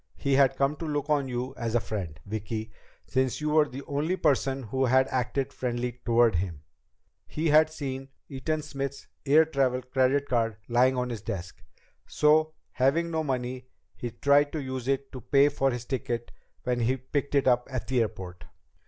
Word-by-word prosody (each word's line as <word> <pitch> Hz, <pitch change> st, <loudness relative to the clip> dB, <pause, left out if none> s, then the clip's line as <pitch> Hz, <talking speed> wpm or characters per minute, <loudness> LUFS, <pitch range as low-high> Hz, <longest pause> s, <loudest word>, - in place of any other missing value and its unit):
He 140 Hz, -, 0 dB
had 135 Hz, -1 st, +4 dB
come 140 Hz, +2 st, +1 dB
to 165 Hz, -, -5 dB
look 145 Hz, 0 st, -2 dB
on 145 Hz, -2 st, +2 dB
you 125 Hz, +1 st, -3 dB
as 115 Hz, 0 st, -2 dB
a -, -, +5 dB
friend, 90 Hz, -9 st, -5 dB
Vicki, 110 Hz, +1 st, -4 dB, 0.3 s
since 130 Hz, -1 st, 0 dB
you 150 Hz, 0 st, -1 dB
were 150 Hz, -1 st, +4 dB
the 135 Hz, +3 st, -7 dB
only 150 Hz, +6 st, -1 dB
person 135 Hz, -3 st, +1 dB
who 130 Hz, +4 st, 0 dB
had 130 Hz, +1 st, +4 dB
acted 130 Hz, +2 st, -1 dB
friendly 125 Hz, -1 st, -3 dB
toward 115 Hz, -2 st, +4 dB
him. 85 Hz, -5 st, -4 dB, 0.6 s
He 160 Hz, +1 st, -1 dB
had 155 Hz, +1 st, +6 dB
seen 135 Hz, -3 st, -5 dB, 0.2 s
Eaton 155 Hz, +3 st, -2 dB
Smith's 140 Hz, -2 st, -5 dB, 0.2 s
air 155 Hz, +3 st, +6 dB
travel 130 Hz, -4 st, 0 dB
credit 130 Hz, +2 st, +1 dB
card 115 Hz, -3 st, 0 dB
lying 125 Hz, +2 st, +3 dB
on 125 Hz, 0 st, -1 dB
his 115 Hz, -4 st, -5 dB
desk. 90 Hz, -4 st, -6 dB, 0.5 s
So, 155 Hz, +1 st, +3 dB, 0.2 s
having 160 Hz, +6 st, +1 dB
no 160 Hz, -1 st, 0 dB
money, 130 Hz, -2 st, -3 dB, 0.3 s
he 120 Hz, -, -4 dB
tried 140 Hz, +5 st, +3 dB
to 155 Hz, -, -2 dB
use 130 Hz, -1 st, -5 dB
it 135 Hz, 0 st, -1 dB
to 130 Hz, -, -8 dB
pay 140 Hz, +4 st, +4 dB
for 135 Hz, -1 st, +1 dB
his 120 Hz, -2 st, -4 dB
ticket 120 Hz, -2 st, -3 dB, 0.3 s
when 125 Hz, -1 st, 0 dB
he 125 Hz, +3 st, +1 dB
picked 140 Hz, +2 st, -3 dB
it 140 Hz, -, +3 dB
up 125 Hz, -1 st, +3 dB
at 130 Hz, -2 st, -3 dB
the 130 Hz, -2 st, +1 dB
airport. 90 Hz, -5 st, -5 dB
130 Hz, 185 wpm, -28 LUFS, 120-140 Hz, 0.6 s, had